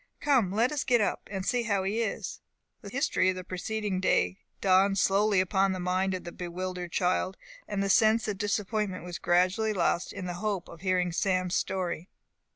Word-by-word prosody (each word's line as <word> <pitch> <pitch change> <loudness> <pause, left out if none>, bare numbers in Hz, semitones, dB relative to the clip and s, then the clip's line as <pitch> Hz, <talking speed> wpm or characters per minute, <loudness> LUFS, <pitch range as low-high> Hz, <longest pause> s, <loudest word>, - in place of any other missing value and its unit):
Come, 255 -10 +2
let 230 +6 +2
us 295 -1 -1
get 245 -2 +3
up, 210 - -1
and 190 -2 -3
see 245 -1 +1
how 205 -5 0
he 205 +4 0
is." 220 - -3 0.4
The 200 - -8
history 255 -6 +1
of 185 - 0
the 185 - -6
preceding 195 +2 -3
day 90 - +1 0.2
dawned 195 +1 +4
slowly 200 +1 +3
upon 190 +1 +2
the 185 - -4
mind 185 +1 0
of 185 - -6
the 175 - -7
bewildered 180 0 -5
child, 185 +1 0 0.3
and 200 -1 -1
the - - 0
sense 220 +3 +4
of 205 -3 -3
disappointment 205 -2 -1
was 175 -1 -6
gradually 185 +5 +2
lost 175 -2 0
in 185 - -6
the 180 - -3
hope 205 -4 -2
of 165 - -12
hearing 185 -2 +1
Sam's 185 0 0
story. 180 -2 -2
190 Hz, 190 wpm, -29 LUFS, 185-210 Hz, 0.4 s, dawned